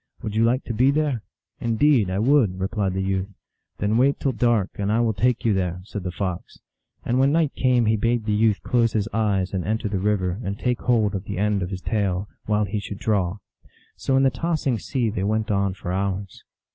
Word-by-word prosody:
Would 105 - -4
you 110 - +3
like 125 +3 +2
to 115 - -4
be 125 +5 +3
there? 145 -5 0
" - - -68
" - - -54
Indeed 115 -2 +3
I 95 - -1
would," 110 -5 +3
replied 95 0 -1
the 95 - -1
youth. 95 0 -1 0.3
" - - -53
Then 105 +2 +1
wait 135 +3 +3
till 135 - +1
dark, 115 -4 +1
and 100 +1 0
I 110 - +2
will 115 -2 +2
take 120 +4 0
you 110 - +4
there," 90 -2 -1
said 105 +1 -6
the 90 0 -4
Fox. 90 -1 -4 0.5
And 125 +2 +1
when 135 +1 +4
night 160 -2 +2
came 125 -2 +2
he 110 +1 +2
bade 115 +1 0
the 105 - 0
youth 105 0 +2
close 115 -2 +2
his 105 -1 0
eyes 100 -4 0
and 95 -2 -1
enter 110 +1 -1
the 100 -2 -2
river, 95 0 0
and 100 0 -3
take 125 +1 -1
hold 110 -4 +2
of 95 0 -4
the - - -5
end 105 0 +1
of 90 - -3
his 95 -1 -5
tail, 100 -3 -1 0.2
while 105 0 +2
he 100 +2 -3
should 100 0 -7
draw. 100 -3 0 0.6
So 135 - 0
in 135 - +4
the 135 - +4
tossing 155 -8 -1
sea 120 -2 -1
they 100 -3 -2
went 110 +2 0
on 100 -2 +1
for 90 -1 -5
hours. 95 0 -3
105 Hz, 235 wpm, -23 LUFS, 95-120 Hz, 0.6 s, you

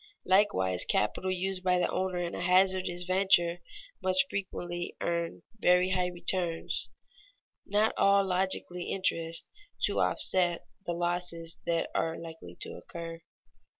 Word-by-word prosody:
Likewise 180 - +3
capital 105 - 0
used 185 0 -2
by 180 -1 +3
the 180 - +2
owner 185 -1 -1
in 175 -1 -3
a - - -4
hazardous 185 0 +2
venture 180 -2 +3 0.4
must 185 0 +5
frequently 175 -3 -4
earn 170 -1 -2 0.2
very 180 0 +4
high 180 -1 +1
returns 175 -1 0 0.8
(not 210 +2 +2
all 200 0 +4
logically 180 -1 -1
interest) 165 -3 0 0.4
to - - +2
offset 175 -2 +2 0.2
the 175 - 0
losses 175 -1 -2
that 165 -1 0
are 165 0 -1
likely 160 - -10
to - - -3
occur. 165 0 -8
180 Hz, 125 wpm, -30 LUFS, 170-185 Hz, 0.8 s, must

